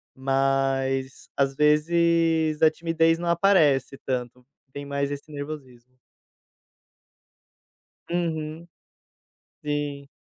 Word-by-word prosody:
mas, 135 0 0
às 135 -1 +1
vezes, 160 +1 +2
a 160 - +7
timidez 165 0 +1
não 175 +1 -4
aparece 165 -7 +3
tanto. 125 -1 -4 0.3
Tem 140 +1 -7
mais 140 0 -2
esse 145 +2 -7
nervosismo. 130 -4 -9 2.1
Uhum, 165 -1 -3 1.0
sim. 145 -1 -3
145 Hz, 80 wpm, -25 LUFS, 135-165 Hz, 2.1 s, a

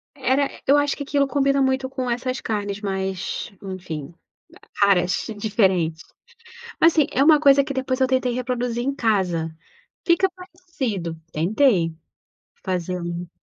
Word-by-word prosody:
Era, 270 +1 +1 0.2
eu 285 +2 +6
acho 290 -1 +1
que 285 - -4
aquilo 280 0 +1
combina 275 -1 +2
muito 265 0 +1
com 260 -2 -3
essas 255 +2 -2
carnes 205 -2 -3
mais, 190 +1 -3
enfim, 175 -5 -6 0.7
caras, 185 -3 +3
diferentes. 190 -7 +1 0.8
Mas 330 0 +6
assim, 305 -4 +3
é 270 - +2
uma 305 -1 +6
coisa 280 -2 +6
que 275 - -5
depois 260 0 -2
eu 260 - +4
tentei 255 -1 +1
reproduzir 245 -1 -2
em 275 +1 -1
casa. 180 -9 0 0.5
Fica 370 +2 +3
parecido, 335 - -5
tentei, 175 - +2 0.7
fazendo 175 -2 -3
240 Hz, 135 wpm, -22 LUFS, 185-275 Hz, 0.8 s, eu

